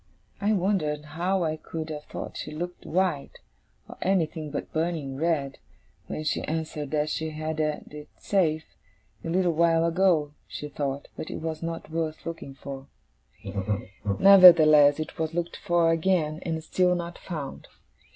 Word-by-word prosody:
I 210 +2 +2
wondered 175 -7 0
how 180 +3 0
I 155 -1 -1
could 160 0 -6
have 150 -1 -6
thought - - -7
she - - -5
looked 175 +4 -6
white, 175 -5 0 0.5
or - - -12
anything 165 -5 0
but 145 - -5
burning 160 -4 -2
red, 145 -2 -1 0.5
when 155 - -4
she 155 - 0
answered 155 -2 -3
that 150 0 0
she 160 0 -2
had 155 0 -4
had 150 -1 -2
it 150 0 -9
safe, 160 -5 +1 0.6
a - - -4
little 180 +1 +2
while 165 0 +3
ago, 170 -4 +2
she 150 - -6
thought, 140 -1 -3
but - - -6
it - - -4
was 160 -1 -4
not 165 -1 -5
worth 160 -1 -3
looking 165 -5 -6
for. 135 0 -8 1.3
Nevertheless, 160 -7 +8
it 155 +1 -6
was 160 0 -2
looked 175 0 -2
for 170 -1 +2
again, 165 -2 +1
and 160 -2 -3
still 180 +2 +2
not 170 0 -5
found. 155 -6 -6
160 Hz, 155 wpm, -26 LUFS, 150-175 Hz, 1.3 s, Nevertheless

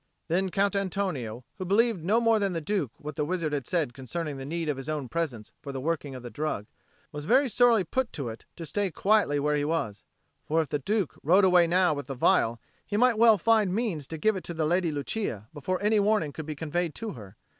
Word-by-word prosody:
Then 185 +3 +1
Count 200 +1 +1
Antonio, 175 - -2 0.2
who - - -2
believed 210 -1 +2
no 210 +7 +3
more 230 -2 +3
than 200 -2 0
the 165 - -1
Duke 165 - -1
what 150 0 -7
the 150 - 0
wizard 165 -1 -2
had 140 -4 -2
said 160 -9 0
concerning 145 +3 -4
the 135 0 -7
need 165 +1 -3
of 145 -3 -1
his 135 +2 -6
own 150 -4 -2
presence 125 -7 -3
for 140 - -6
the 135 - -4
working 145 -1 -2
of 125 - -8
the 120 - -7
drug, 145 -4 -3 0.5
was 150 0 -6
very 265 - +4
sorely 235 -3 +4
put 250 +8 -1
to 140 -5 -4
it 115 - -9
to 165 - -7
stay 205 +4 -1
quietly 195 -4 +2
where 150 +1 +1
he 145 - 0
was; 145 -9 -2 0.4
for 160 +2 +1
if 160 - 0
the 145 - -1
Duke 200 +3 -1
rode 185 +6 +5
away 180 -2 +5
now 180 -1 +3
with 145 -1 -5
the 135 -2 -5
phial, 115 -1 +3 0.2
he 205 - -3
might 240 -1 +4
well 225 -2 +7
find 215 -2 +3
means 195 - -2
to 160 - -5
give 215 +7 +2
it 185 - -5
to 170 - -5
the 160 -1 0
Lady 175 +1 +1
Lucia 145 - -3
before 170 +5 -2
any 210 +1 +3
warning 205 -8 +1
could 160 -1 -7
be 155 - -4
conveyed 160 +2 -2
to 225 -2 -4
her. 105 -6 -11
165 Hz, 240 wpm, -28 LUFS, 145-200 Hz, 0.5 s, well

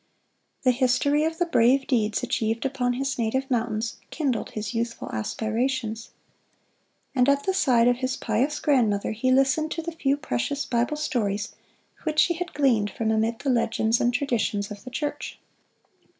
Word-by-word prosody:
The 255 - +5
history 265 +4 +2
of 320 0 -2
the 350 - +1
brave 265 -3 +3
deeds 220 -3 0
achieved 230 -1 -1
upon 255 -2 0
his 270 +1 -2
native 260 +4 0
mountains, 225 -2 -1
kindled 270 -8 -1
his 210 -2 -5
youthful 235 0 -3
aspirations. 225 - -2 1.0
And 250 0 +3
at 280 0 +2
the 380 - 0
side 250 -11 +3
of 245 0 +3
his 260 +1 -2
pious 255 +7 0
grandmother 225 -9 +2
he 230 +4 -1
listened 270 +4 +3
to 330 - -4
the 335 - -4
few 285 -4 0
precious 275 - -2
Bible 245 +5 0
stories 220 -7 -2 0.5
which 310 -2 -3
she 345 +3 +4
had 355 +1 -6
gleaned 235 -8 +2
from 220 +2 -1
amid 220 +1 +1
the 275 - +1
legends 230 -1 +1
and 240 - +3
traditions 220 -6 -1
of 205 -1 -8
the - - -6
church. 290 +3 -4
250 Hz, 165 wpm, -25 LUFS, 225-280 Hz, 1.0 s, The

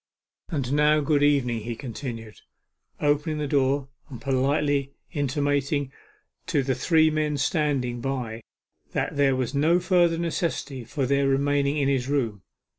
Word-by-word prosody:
'And 140 -6 -2
now, 150 +1 +4
good 145 0 +1
evening,' 135 -5 +2
he 115 +2 -4
continued, 115 -3 -7 0.6
opening 150 +1 +1
the 150 - -2
door 135 0 +1 0.2
and 125 -4 -8
politely 140 +1 0 0.2
intimating 145 0 0 0.6
to 140 - +1
the 130 0 0
three 160 +3 +3
men 150 -1 0
standing 135 -6 0
by 125 -4 -3 0.5
that - - -1
there 140 -2 +3
was 130 0 -2
no 160 +5 +3
further 175 -2 +3
necessity 165 -6 -2
for 135 +4 -2
their 140 +1 +2
remaining 140 +1 +1
in 140 -2 +1
his 135 -2 0
room. 115 -9 -1
140 Hz, 140 wpm, -25 LUFS, 130-150 Hz, 0.6 s, now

